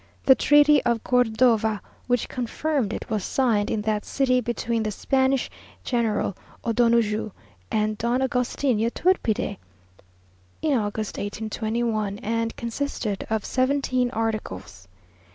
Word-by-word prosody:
The 265 - +9
treaty 295 +2 +5
of 235 -2 0
Cordova, 225 -3 +2 0.3
which 245 -2 +1
confirmed 255 -1 -2
it, - - -5
was 215 -3 0
signed 225 -5 +1
in 210 - -1
that 215 -1 0
city 255 -2 +1
between 235 -1 -1
the 215 - -1
Spanish 265 +5 +1 0.4
General 225 -6 0 0.3
O'Donoju 230 -2 +2 0.4
and 215 0 0
Don 240 +2 +1
Agustin 260 -2 0
Yturbide, 235 - 0 1.0
in 310 -2 +2
August 215 -2 -2
1821, 215 0 -2
and 230 +1 -1
consisted 235 -4 -3
of 220 -2 -1
seventeen 255 -1 +1
articles. 105 - -4
230 Hz, 115 wpm, -24 LUFS, 215-255 Hz, 1.0 s, The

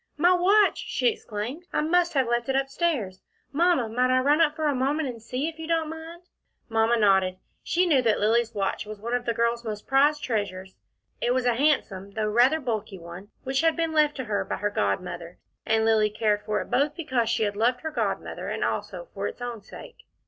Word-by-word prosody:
"My 350 +4 +5
watch!" 390 +3 +4
she 485 - 0
exclaimed. 265 - -6
"I - - +1
must 345 +2 +2
have 265 -2 +3
left 240 +1 -1
it 265 - +1
up 270 0 0
stairs. 270 - -1 0.3
Mamma 330 -5 +2
might 250 +3 +1
I 255 - +3
run 290 +5 +3
up 305 -2 +3
for 315 -1 -2
a 295 - +2
moment 280 +4 0
and 230 -2 -8
see, 255 +6 -3
if 325 0 -7
you 320 - -6
don't 325 -2 0
mind?" 325 +2 -9 0.5
Mamma 225 +1 +2
nodded. 190 -3 +3 0.2
She 360 +2 +1
knew 295 -7 +4
that 225 -3 +2
Lilly's 230 +2 +1
watch 200 +1 -2
was 215 -1 -8
one 235 +3 -4
of 245 0 -1
the 235 - 0
girl's 235 +1 0
most 215 -2 -5
prized 290 +2 +3
treasures. 190 -5 -3 0.5
It 245 - +1
was 255 -1 0
a 245 - +3
handsome, 230 -8 0
though 215 -1 0
rather 245 +8 +4
bulky 215 -7 -3
one, 175 +3 -10
which 265 +2 0
had 325 -1 +3
been 330 -1 -1
left 300 -1 +3
to 260 - -4
her 215 -4 -1
by - - -3
her 205 0 -2
godmother, 170 - -2 0.3
and 220 0 +2
Lilly 220 -1 +3
cared 210 -1 0
for 210 -1 0
it - - -9
both 290 +2 +1
because 260 -9 -1
she 225 -1 +1
had 205 -1 -1
loved 245 +4 +1
her 315 - -4
godmother, - - -3
and - - -2
also - - -3
for - - -3
its - - -8
own 240 -3 -5
sake. - - -13
245 Hz, 220 wpm, -26 LUFS, 215-305 Hz, 0.5 s, My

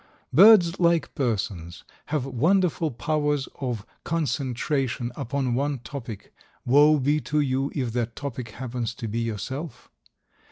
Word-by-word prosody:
Birds, 190 -2 +7
like 170 -2 +2
persons, 95 - -3 0.2
have 145 -4 -1
wonderful 165 +5 +1
powers 145 +1 -1
of 120 -6 -3 0.2
concentration 135 -4 -1
upon 135 -1 -2
one 140 +3 0
topic, 115 -3 -8 0.3
woe 145 +4 +6
be 145 +2 +1
to 150 +1 -1
you 135 -1 0
if 125 -6 -2
that 120 -1 -2
topic 130 -4 -5
happens 120 0 -4
to 115 - -5
be 110 +2 -2
yourself! 115 - -5
135 Hz, 125 wpm, -25 LUFS, 120-150 Hz, 0.3 s, Birds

